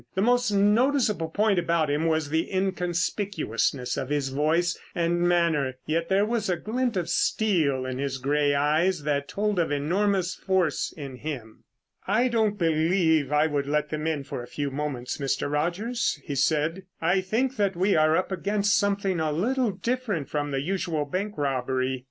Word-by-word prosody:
The 190 - +1
most 245 0 +3
noticeable 210 - +2
point 205 +2 +2
about 170 -2 +1
him 150 +3 +1
was 160 -2 0
the 160 +1 0
inconspicuousness 180 - -1
of 130 - -6
his 145 -2 0
voice 160 +6 +1 0.2
and 175 0 +1
manner, 170 -7 +2
yet 165 +2 -1
there 195 +2 +3
was 220 -2 -1
a 180 - +1
glint 240 +2 -1
of 175 -2 -1
steel 155 -12 +1
in 130 0 -4
his 135 -1 -2
gray 145 +2 +1
eyes 155 +4 +1
that 140 -1 -1
told 210 -2 -1
of 165 - 0
enormous 185 +5 +1
force 185 -6 0
in 135 -4 -7
him. 125 -7 -7 0.4
"I 230 +6 +2
don't 220 -3 +1
believe 160 -3 +2
that 150 - 0
I 150 +1 +4
would 145 -3 -1
let 150 +1 0
them 155 +1 -3
in 155 -3 -1
for 135 - -6
a 120 - -9
few 145 +1 -3
moments, 135 -3 -3
Mr. 140 +1 -1
Rogers," 200 +11 -1
he 145 - -4
said. 155 +6 0
"I 175 +4 +2
think 240 +8 -1
that 200 -3 +1
we 190 +3 +2
are 155 +1 +4
up 185 - -1
against 200 +2 +1
something 200 -3 +1
a 155 -1 0
little 240 - +1
different 210 - -2
from 145 -1 -2
the 135 -1 -1
usual 170 -2 -1
bank 200 +8 -3
robbery." 130 -2 -1
165 Hz, 175 wpm, -26 LUFS, 145-200 Hz, 0.4 s, I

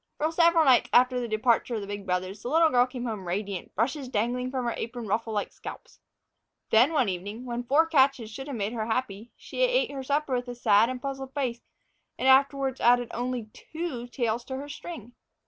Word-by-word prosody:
For 310 +2 0
several 335 -1 +4
nights 255 -3 +5
after 250 0 +5
the 240 - -3
departure 230 +2 +1
of 215 - -3
the - - -5
big 200 0 -6
brothers, 185 +3 -2
the 240 - -4
little 320 +2 +4
girl 245 0 +4
came 250 -1 -6
home 210 -6 -5
radiant, 195 0 -4
brushes 260 +5 -1
dangling 250 +3 -1
from 255 -1 -3
her 235 - 0
apron 235 0 -5
ruffle 220 +2 -1
like 210 -1 -2
scalps. - - -10 0.7
Then, 240 +7 +5
one 275 -8 +2
evening, 200 +6 -5
when 240 -1 -3
four 290 +6 +4
catches 270 -7 +2
should 270 +5 -7
have 280 - -5
made 210 0 -2
her 220 -2 -3
happy, 225 -2 -3
she - - -6
ate - - +2
her 275 -1 -5
supper 285 +1 -1
with 250 0 -1
a 245 - -6
sad 225 -1 +4
and 255 -1 -4
puzzled 270 0 -6
face, 250 -4 -2 0.6
and 260 - -1
afterward 270 0 +3
added 245 0 +4
only 245 -2 -3
two 315 -7 -6
tails 235 -2 -2
to 265 - -5
her 285 +2 -7
string. 290 -6 -8
245 Hz, 210 wpm, -27 LUFS, 220-270 Hz, 0.7 s, nights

